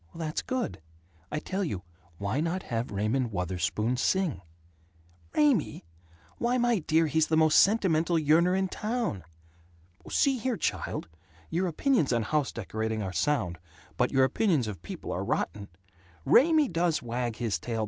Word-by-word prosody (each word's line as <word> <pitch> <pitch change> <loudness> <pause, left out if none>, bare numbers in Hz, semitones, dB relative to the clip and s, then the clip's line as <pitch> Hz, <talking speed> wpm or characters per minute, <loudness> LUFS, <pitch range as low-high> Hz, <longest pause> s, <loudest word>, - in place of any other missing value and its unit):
"That's 160 -2 -3
good. 255 - -3 0.5
I - - -2
tell 190 +6 -2
you: 100 - -3 0.3
why 100 +8 -2
not 170 +4 -1
have 115 +1 -3
Raymond 110 +5 -1
Wutherspoon 95 +6 -1
sing?" 185 - 0 0.9
"Raymie? 245 - +2 0.5
Why, 245 +1 +1
my 240 -3 +2
dear, 160 0 +2
he's 160 0 +2
the 160 - +2
most 155 -1 +5
sentimental 175 -5 +3
yearner 165 +4 +3
in 190 0 +1
town!" 215 - -3 0.9
"See 270 -3 +2
here, 240 0 -1
child! - - -2 0.4
Your 180 +3 0
opinions 175 - +1
on 120 -2 +1
house 150 +2 0
decorating 110 0 -3
are 95 -1 -4
sound, 90 - 0 0.4
but 125 - +1
your 135 -1 +4
opinions 155 - +2
of 100 -6 -6
people - - -7
are - - -2
rotten! 100 -1 -2 0.6
Raymie 310 +1 +5
does 165 -4 0
wag 120 -1 -2
his 115 -3 -2
tail. 115 -2 -4
155 Hz, 150 wpm, -28 LUFS, 115-190 Hz, 0.9 s, most